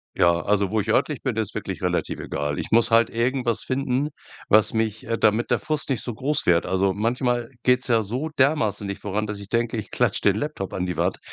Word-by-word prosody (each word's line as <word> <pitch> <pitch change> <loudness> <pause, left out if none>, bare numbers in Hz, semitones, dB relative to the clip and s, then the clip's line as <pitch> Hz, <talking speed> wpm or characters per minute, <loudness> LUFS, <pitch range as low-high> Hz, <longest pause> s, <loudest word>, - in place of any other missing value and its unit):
Ja, 85 0 +3
also 100 -1 +1
wo 110 - +1
ich 110 - -6
örtlich 145 +5 +1
bin 130 -5 -2
ist 110 -2 -2
wirklich - - -5
relativ - - -1
egal. 75 0 -3
Ich - - -4
muss 115 +1 +4
halt 115 0 +4
irgendwas 120 0 0
finden, 135 +2 -1 0.4
was 110 +1 +4
mich, 110 -1 -1
äh 115 -1 -1
damit 110 +2 +2
der - - +3
Frust 155 -2 -2
nicht 120 - -1
so 120 -3 -5
groß 145 +5 -1
wird. 85 -1 +4
Also 95 0 +1
manchmal 120 +3 -1
geht's 125 +1 +3
ja 115 -2 +3
so 125 +10 -3
dermaßen 130 -8 +1
nicht 100 - -5
voran, 105 +1 -2
dass 105 -1 -3
ich 100 - -8
denke 115 -1 0
ich 105 - -6
klatsch - - +1
den 100 -1 +4
Laptop 110 -6 -4
an 90 0 -2
die 90 - -4
Wand. 90 +3 0
110 Hz, 230 wpm, -23 LUFS, 100-125 Hz, 0.4 s, muss